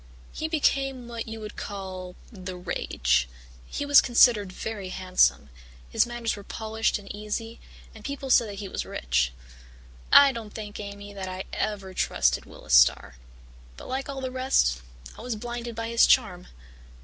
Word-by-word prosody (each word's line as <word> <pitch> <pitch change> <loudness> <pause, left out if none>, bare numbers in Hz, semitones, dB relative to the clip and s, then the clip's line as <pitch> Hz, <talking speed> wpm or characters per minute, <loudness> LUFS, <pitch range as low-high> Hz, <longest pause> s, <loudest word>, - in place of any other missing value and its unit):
He 315 - -3
became 270 -5 0
what 235 -1 -6
you 225 0 -6
would 210 -1 -8
call 185 -2 -6 0.2
the 185 -4 -7
rage. 65 - 0 0.4
He 290 - -4
was 285 0 +8
considered 235 -5 +4
very 200 -1 -5
handsome, 185 - +2 0.4
his - - +3
manners 240 -1 -2
were 200 - -10
polished 220 +1 -1
and 205 -1 -13
easy, 220 +2 -5 0.3
and 220 - -13
people 275 0 -4
said 220 -5 +4
he 200 0 -6
was - - -4
rich. 60 0 0 0.8
"I 280 -1 +9
don't 225 -4 -8
think, 210 -2 -7
Amy, 205 0 -8
that 195 -1 -6
I 185 +1 -5
ever 200 -3 -3
trusted 65 - +1
Willis - - -7
Starr. - - +5 0.6
But - - -10
like 265 +2 -3
all 275 -1 -5
the 260 -1 -3
rest, 255 - +2 0.4
I - - -8
was 240 0 -3
blinded 240 +1 -6
by 230 0 -3
his 235 0 +5
charm. 190 -8 +2
215 Hz, 160 wpm, -26 LUFS, 185-240 Hz, 0.8 s, I